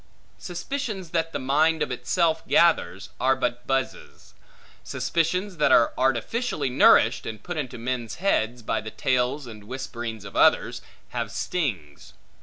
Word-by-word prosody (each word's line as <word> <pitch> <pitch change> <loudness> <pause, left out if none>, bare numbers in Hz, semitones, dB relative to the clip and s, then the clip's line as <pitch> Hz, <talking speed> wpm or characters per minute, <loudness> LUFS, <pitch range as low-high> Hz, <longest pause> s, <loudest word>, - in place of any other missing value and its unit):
Suspicions 190 - -5
that 165 -1 0
the - - -2
mind 150 +5 +2
of - - -4
itself 160 +6 0
gathers, 100 - +2
are 135 +1 +3
but 125 -1 -3
buzzes; 135 -1 -3 0.5
but - - -21
suspicions 180 +3 -1
that 150 - +3
are 115 - +5
artificially 135 - 0
nourished, 125 - +5
and 110 -1 -7
put 175 - -5
into 135 -6 -4
men's 120 -1 -3
heads, 120 - 0
by - - -1
the 110 - -7
tales 130 +4 0
and 105 -3 -11
whisperings 115 -3 -6
of 100 - -10
others, - - +3 0.3
have - - -3
stings. 95 - -4
130 Hz, 145 wpm, -25 LUFS, 120-165 Hz, 0.5 s, are